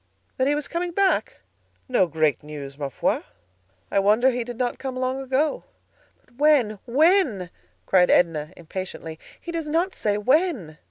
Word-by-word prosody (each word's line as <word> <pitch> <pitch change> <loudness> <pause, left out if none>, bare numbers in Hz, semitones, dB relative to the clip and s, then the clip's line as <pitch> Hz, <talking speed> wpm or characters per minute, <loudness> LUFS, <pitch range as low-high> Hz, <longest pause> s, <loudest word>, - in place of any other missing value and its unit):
"That 260 - +2
he 290 - +2
was 295 -1 -3
coming 345 +2 -3
back? 395 +6 +1 0.5
No 245 -8 +3
great 155 -3 +1
news, 145 -2 -8
ma 140 -1 -4
foi. - - 0 0.7
I - - +3
wonder 215 +6 +4
he 245 -1 -2
did 240 0 -8
not 245 -1 -2
come 265 -2 -5
long 255 +1 -2
ago." 270 +3 0 0.6
"But 245 - -28
when, 270 -9 +3
when?" 270 - +3 0.3
cried 180 -2 +4
Edna, 160 -3 +2
impatiently. 170 -2 -7 0.2
"He 340 - -7
does 325 -3 -4
not 340 +5 +1
say 205 -1 -1
when." 250 - +1
245 Hz, 160 wpm, -24 LUFS, 180-300 Hz, 0.7 s, wonder